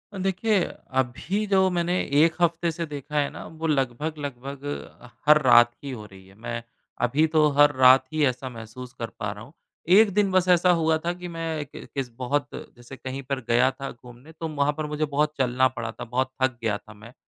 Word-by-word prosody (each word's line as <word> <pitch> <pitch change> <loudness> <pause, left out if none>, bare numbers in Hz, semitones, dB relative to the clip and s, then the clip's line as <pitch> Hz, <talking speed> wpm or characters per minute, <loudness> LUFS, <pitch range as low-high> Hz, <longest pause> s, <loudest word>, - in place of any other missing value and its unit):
देखिए, 190 +1 +1 0.3
अभी 130 - -1
जो 190 -1 +3
मैंने 175 +1 0 0.2
1 165 -1 +2
हफ्ते 170 0 +2
से 170 +1 -4
देखा 150 0 -8
है 140 - +1
ना, - - -9
वो 160 0 -5
लगभग-लगभग 140 -1 -3 0.7
हर 150 0 +7
रात 120 -2 +6
ही 140 - -5
हो 110 -4 -7
रही 95 -2 -15
है। 95 - -19
मैं 115 +1 -5 0.4
अभी 150 +6 +2
तो 155 -1 +3
हर 145 0 +7
रात 130 0 +6
ही 155 -1 +1
ऐसा 130 0 -2
महसूस 120 +2 -10
कर 115 - -3
पा 105 -2 -2
रहा 105 +1 -9
हूँ। 140 +6 -15 0.4
एक 215 0 +7
दिन 200 -2 +2
बस 185 -1 +2
ऐसा 180 0 +5
हुआ 160 0 +2
था 175 - 0
कि 180 0 -8
मैं 160 -2 -3 0.5
बहुत 140 +3 -1
जैसे 120 +2 -10
कहीं 130 +1 -6
पर 135 0 -3
गया 125 +3 +4
था 135 +1 -7
घूमने 120 +5 -15
तो 160 0 -6
वहाँ 145 -1 +1
पर 155 - -2
मुझे 150 +1 -1
बहुत 150 +1 0
चलना 130 0 +3
पड़ा 115 -3 -5
था, 120 - -8
बहुत 130 +2 -1
थक 130 -2 +1
गया 105 -3 0
था 110 - -15
मैं। 110 +4 -14
140 Hz, 200 wpm, -25 LUFS, 125-160 Hz, 0.7 s, हर